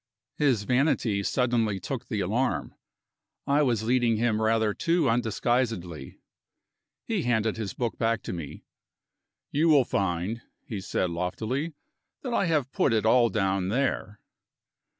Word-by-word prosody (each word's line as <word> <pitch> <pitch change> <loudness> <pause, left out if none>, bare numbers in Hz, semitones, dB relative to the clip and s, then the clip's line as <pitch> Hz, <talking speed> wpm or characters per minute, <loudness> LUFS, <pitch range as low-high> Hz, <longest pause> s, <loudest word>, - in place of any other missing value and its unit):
His 130 -8 +2
vanity 125 -4 +1
suddenly 115 -3 +1
took - - -5
the - - -2
alarm - - -1 0.7
I 145 +1 +3
was 120 -6 +1
leading 120 -1 +2
him 110 -1 +1
rather 110 -1 +2
too 165 +2 +1
undisguisedly. 115 -6 -1 0.9
He 220 -5 -1
handed 110 -5 0
his 110 -3 -4
book 120 -2 -3
back 115 -1 0
to - - -5
me. 85 -5 -7 0.9
"You 160 +3 +2
will 140 -5 +5
find," 95 +4 -1 0.2
he 110 -9 -5
said 90 -1 -1
loftily, 110 - -2 0.5
"that 250 -3 -3
I 200 - +2
have 150 -5 0
put 130 - +2
it 110 -1 +1
all 120 +1 +5
down 95 -2 0
there." 105 -4 -1
115 Hz, 135 wpm, -27 LUFS, 105-130 Hz, 0.9 s, will